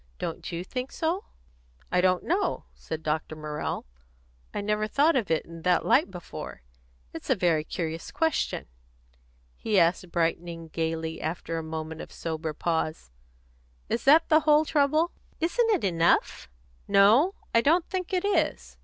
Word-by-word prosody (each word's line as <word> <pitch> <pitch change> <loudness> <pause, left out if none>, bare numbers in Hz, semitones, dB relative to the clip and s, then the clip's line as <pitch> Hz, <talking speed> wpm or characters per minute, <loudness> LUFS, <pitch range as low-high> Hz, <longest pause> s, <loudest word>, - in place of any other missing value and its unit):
Don't 165 - -5
you 170 +1 -3
think 255 +7 -5
so?" 335 +4 -1 0.7
"I 180 - +3
don't 185 -1 +2
know," 370 +5 0
said 160 0 -7
Dr. 155 0 -2
Morrell. 150 -1 -4 0.7
"I - - -3
never 210 +1 0
thought 290 +8 +3
of 230 -8 0
it 160 -1 +1
in 165 0 -10
that 180 +1 +2
light 270 -4 +4
before. 175 - -8 0.5
It's - - -8
a - - +4
very 170 -5 +2
curious 165 0 -4
question." 320 0 0 0.9
He 210 -3 +1
asked, 170 +1 +2
brightening 165 0 -1
gaily 160 0 -3
after 165 0 -3
a - - -5
moment 160 0 -5
of - - -10
sober 160 -1 -4
pause, 160 - -2 0.8
"Is 235 - -1
that 310 +4 +6
the 310 -1 +6
whole 305 0 +4
trouble?" 305 +3 +2 0.3
"Isn't 450 +9 +1
it 410 -6 +2
enough?" 170 - +1 0.4
"No; 225 - +5 0.2
I 230 - +5
don't 330 +6 +3
think 370 -1 -3
it 370 0 0
is. 410 - 0
180 Hz, 155 wpm, -27 LUFS, -, 0.9 s, that